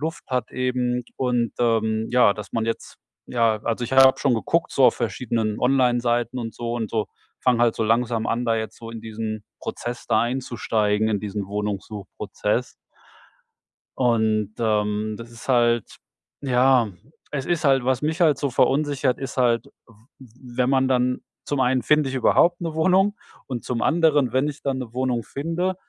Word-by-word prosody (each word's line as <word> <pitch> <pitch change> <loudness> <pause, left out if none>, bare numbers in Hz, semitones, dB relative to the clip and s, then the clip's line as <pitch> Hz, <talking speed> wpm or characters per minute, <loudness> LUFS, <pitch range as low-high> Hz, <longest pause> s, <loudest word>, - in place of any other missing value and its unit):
Luft 160 0 -4
hat 125 -3 -2
eben 125 -1 -1
und, 125 -3 0
ähm, 110 -2 +1
ja, 125 -4 +5
dass 105 -1 -9
man 115 - 0
jetzt 115 - -4 0.3
ja, 115 -3 +1
also, 115 +1 -1
ich 125 - -6
habe 135 0 +6
schon 135 - +2
geguckt 165 +9 0
so 135 - +4
auf - - +4
verschiedenen 115 -2 -2
Onlineseiten 125 -1 +1
und 115 -2 -5
so 120 -1 -4
und 115 -2 -3
so 110 -2 -1 0.3
fange 125 -2 +2
halt 120 -2 +3
so 110 - 0
langsam 115 0 +1
an, 120 +2 -1
da 115 -1 +2
jetzt 110 0 -4
so 115 0 -9
in 115 -1 -7
diesen 110 -1 -5 0.2
Prozess 120 0 -6
da 110 -2 +3
einzusteigen, 110 -4 0
in 105 -2 0
diesen 105 -1 -4
Wohnungssuchprozess. 105 0 -3 1.3
Und, 110 -4 +1
ähm, 105 -1 0
das 115 0 -10
ist 115 +3 -12
halt 120 -2 +2 0.4
ja, 130 -3 +3 0.4
es 140 -3 -3
ist 170 -2 -1
halt 135 -3 +3
was 130 0 +1
mich 155 +3 -2
halt 155 -5 +4
so 140 0 -1
verunsichert, 135 0 +1
ist 135 -1 -6
halt 120 -2 +2 0.2
w 115 - -19 0.3
w 125 0 -14
wenn 125 +1 +2
man 130 -1 +3
dann 125 -1 +1 0.2
zum 145 - -2
einen 130 0 +2
finde 150 +2 +3
ich 130 - -5
überhaupt 175 +6 +3
'ne 165 -2 -4
Wohnung? 190 +5 +3 0.3
Und 125 -3 -5
zum 120 -2 -2
anderen, 150 -6 +3
wenn 130 +2 +2
ich 150 -1 -6
dann 135 -2 -1
'ne 120 -3 -7
Wohnung 125 -3 -1
finde, 165 +6 -2
120 Hz, 175 wpm, -23 LUFS, 115-135 Hz, 1.3 s, habe